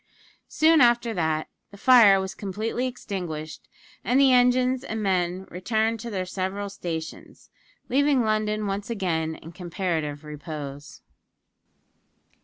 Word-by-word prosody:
Soon 315 0 +4
after 240 -1 +3
that, 160 -4 -1 0.2
the 200 - -14
fire 220 -4 +7
was 190 0 -4
completely 220 +5 -3
extinguished, 175 -10 -6 0.3
and 250 +3 +2
the 270 -2 +6
engines 250 +1 +3
and 220 -4 -4
men 185 -1 0
returned 220 +5 -1
to 235 +2 -6
their 190 -4 -3
several 195 +2 -4
stations, 165 -4 -7 0.4
leaving 275 -1 +2
London 215 -1 0
once 200 +1 -3
again 165 -7 -1
in 165 - -12
comparative 165 -5 -3
repose. 150 -1 -8
200 Hz, 120 wpm, -25 LUFS, 170-235 Hz, 0.4 s, fire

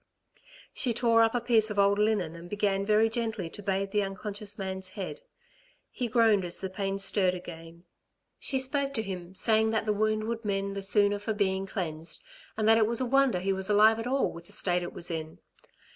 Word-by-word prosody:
She 240 -3 0
tore 230 -1 +3
up 225 +1 +2
a - - +2
piece 230 -2 +2
of 210 - -5
old 200 0 +3
linen 210 -6 0
and 170 +1 -11
began 200 -1 -1
very 215 +1 +4
gently 225 -6 -3
to - - -9
bathe 195 0 -2
the 210 - +1
unconscious 200 +1 -6
man's 190 -1 -5
head. 200 - -5 0.7
He 250 - -3
groaned 225 -4 +3
as 175 -1 +1
the 190 -1 -5
pain 195 0 -2
stirred 195 -2 +2
again. 170 -1 -10 0.6
She 270 - +1
spoke 275 +1 0
to 220 - -1
him, 185 -2 -7
saying 220 +1 +3
that 220 0 -1
the 210 - +1
wound 215 +1 0
would 230 +1 -4
mend 200 -1 -2
the 200 - -4
sooner 205 +1 +2
for 220 +2 -3
being 195 -1 0
cleansed, 165 -4 -3 0.4
and 215 -1 0
that 225 0 +6
it 215 - +3
was 235 0 +1
a 260 - 0
wonder 270 -3 +3
he 195 +2 0
was 190 +1 +1
alive 215 +2 +5
at 225 - -4
all 270 +2 0
with 170 0 -12
the - - -6
state 180 -1 +2
it 175 - -5
was 170 - -1
in. 160 -1 -5
205 Hz, 215 wpm, -28 LUFS, 190-225 Hz, 0.7 s, that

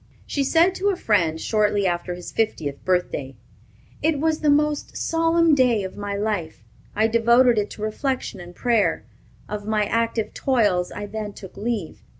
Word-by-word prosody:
She 280 - -1
said 335 +6 +4
to 395 +2 0
a 395 - +1
friend 170 - +1
shortly 210 0 +1
after 175 0 -1
this 180 - -8
fiftieth 160 -11 -2
birthday: 180 -7 -1 0.7
"It 315 -2 +1
was 315 +1 +1
the 305 - +1
most 295 0 +1
solemn 330 0 +2
day 250 -7 +3
of 190 - -6
my 205 0 -4
life. 200 - -3 0.3
I 215 - +3
devoted 235 +1 +4
it 210 - -2
to 210 - -8
reflection 230 -1 -2
and 175 0 -11
prayer. 235 -4 +1 0.4
Of 210 0 -6
my 215 -1 +1
active 230 0 -1
toils 205 -9 +1
I 205 - -5
then 210 0 -5
took 190 -2 -11
leave. 215 -6 -4
215 Hz, 165 wpm, -23 LUFS, 200-265 Hz, 0.7 s, said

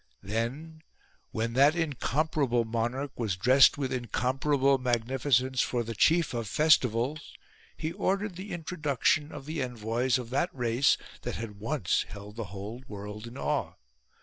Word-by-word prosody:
Then 130 - -3 0.5
when 115 +1 -2
that 140 +5 +5
incomparable 145 -5 0
monarch 120 +5 -2
was 110 -5 0
dressed 130 +10 +6
with 135 -3 -2
incomparable 130 +3 +1
magnificence 125 +1 +1
for 120 -1 0
the 115 0 -5
chief 165 - +3
of 115 -2 -3
festivals, 135 - +2 0.4
he 160 0 -3
ordered 195 +1 -1
the 190 +3 -7
introduction 150 -3 0
of 140 -2 -8
the 155 0 -3
envoys 120 +1 0
of 125 -2 -7
that 155 +7 +1
race 120 +1 +2 0.2
that - - -4
had 105 -3 -7
once 115 - 0
held 105 0 -10
the 115 -1 -4
whole 100 +6 -7
world 105 0 -7
in 120 +3 -10
awe. - - -1
130 Hz, 145 wpm, -29 LUFS, 115-150 Hz, 0.5 s, dressed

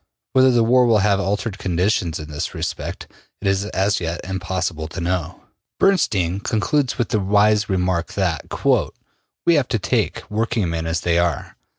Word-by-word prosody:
Whether 130 0 +6
the 120 -2 +3
war 125 +2 +4
will 115 -2 +4
have 100 -2 +3
altered 100 +1 -2
conditions 90 -3 0
in 75 - -8
this 75 - -4
respect, - - -4 0.3
it 100 - -3
is 95 +1 +1
as 100 0 0
yet 85 0 -3
impossible 95 -3 -3
to 85 - -7
know. 85 -1 -3 0.4
Bernstein 100 - +2
concludes 125 +6 0
with 120 - -1
the 105 - +1
wise 105 +2 +3
remark 90 -2 0
that: 90 -6 -1
``We 170 -2 -1
have 135 -3 +1
to 115 - 0
take 100 - -1
working 110 -2 -1
men 80 0 -3
as 80 0 -1
they 85 -1 +2
are. 85 0 -1
95 Hz, 170 wpm, -21 LUFS, 85-110 Hz, 0.4 s, Whether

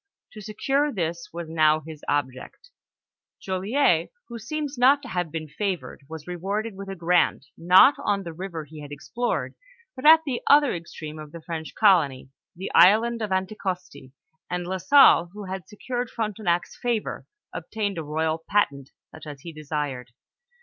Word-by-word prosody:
To 215 - -10
secure 270 +8 0
this 170 - -3
was 170 0 -6
now 155 -1 +3
his 155 -1 -11
object 145 - -3 0.7
Joliet, 205 +8 +1 0.2
who 235 -1 -7
seems 295 +5 -4
not 270 +3 +4
to 250 - -8
have 175 -5 -2
been 160 -1 -5
favored, 180 -2 -4
vas 160 -2 -8
rewarded 195 +5 -3
with 195 0 -8
a 195 - -5
grant, 175 0 +1
not 180 +11 +6
on 200 -1 0
the 170 -2 -7
river 170 -2 -6
he 155 +1 -12
had 145 0 -10
explored, 235 - -3 0.4
but 255 - -9
at 320 +1 +8
the 255 -5 -2
other 290 -2 +6
extreme 155 -2 -8
of 155 -1 -10
the 170 - -10
French 160 -1 -6
colony, 150 - +3 0.2
the 190 +3 -6
island 225 +6 +5
of 215 -2 -3
Anti 190 +2 -1
costi, 180 -8 -5 0.4
and 180 0 -3
La 190 +1 -3
Salle, 185 - +6
who 210 0 -8
had 190 -3 -6
secured 245 +3 -4
Frontenac's 210 -6 -2
favor, 235 -3 -3 0.3
obtained 205 -5 -3
a - - -4
royal 160 +2 -2
patent, 140 -9 +1 0.2
euch - - -11
as 145 -2 -9
he 170 +1 -9
desired. 145 -5 -4
180 Hz, 165 wpm, -25 LUFS, 160-215 Hz, 0.7 s, at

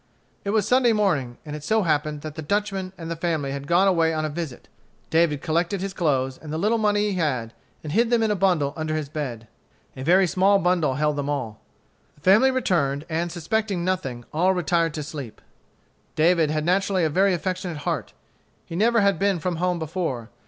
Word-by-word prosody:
It 200 - -3
was 210 -1 +1
Sunday 250 -1 +4
morning, 155 - 0
and 150 -1 -6
it 150 - -8
so 220 +6 +2
happened 150 -2 0
that 155 0 -6
the 160 - -6
Dutchman 195 +2 -2
and 165 -1 -6
the - - -2
family 160 -4 -2
had 140 0 -5
gone 175 +4 +4
away 165 -3 +2
on 155 0 -1
a - - -2
visit. 150 -4 -6 0.4
David 160 -4 +2
collected 170 +4 0
his 195 +1 -4
clothes 135 -7 0
and 155 - -9
the 155 - -2
little 215 +6 +1
money 210 -1 +2
he 190 - -3
had, 125 -8 -1 0.3
and 150 - -5
hid 230 +3 +3
them 235 -2 +3
in 220 - +1
a - - +1
bundle 175 -7 +1
under 155 -1 -2
his 155 -3 -3
bed. 130 -7 -5 0.5
A 130 - -8
very 180 +7 +4
small 190 +3 +3
bundle 175 -7 +1
held 150 0 0
them 145 0 -2
all. 125 -7 -3 0.5
The 145 - -25
family 210 - +5
returned, 165 - 0
and, 170 +2 -1
suspecting 185 +2 -1
nothing, 135 -10 -2
all 180 +4 +2
retired 170 -2 +1
to 150 - -3
sleep. 140 -6 -8 0.8
David 165 0 +3
had 155 0 -1
naturally 190 +1 +1
a - - +3
very 190 +3 +3
affectionate 185 -2 -3
heart. - - -2 0.5
He 165 - -7
never 230 +4 +3
had 200 -1 +2
been 200 -1 +2
from 170 +1 -2
home 180 +1 0
before. 160 -8 -4
170 Hz, 205 wpm, -24 LUFS, 150-195 Hz, 0.8 s, family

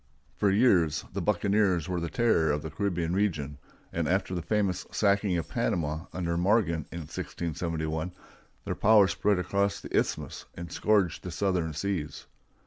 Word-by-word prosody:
For 100 - +2
years 95 -8 +3
the - - -2
buccaneers 100 -5 +2
were 90 -1 -1
the 85 0 -3
terror 85 -5 +2
of 75 0 -1
the 80 - -5
Caribbean 85 -1 -1
region, 75 -8 -1 0.3
and 85 -2 -1
after 95 0 0
the 90 - -2
famous 100 -2 0
sacking 100 -3 +2
of 80 - -3
Panama, 80 0 -1
under 85 -2 -2
Morgan, 90 -4 +2
in 85 - -5
1671, 80 +1 -3 0.5
their - - -1
power 105 -2 +5
spread 100 +1 +1
across 100 +3 0
the - - -6
Isthmus - - -1
and 85 -1 -7
scourged 100 -5 +2
the 90 - -6
southern 90 -3 0
seas. 85 -1 -3
90 Hz, 155 wpm, -28 LUFS, 80-100 Hz, 0.5 s, power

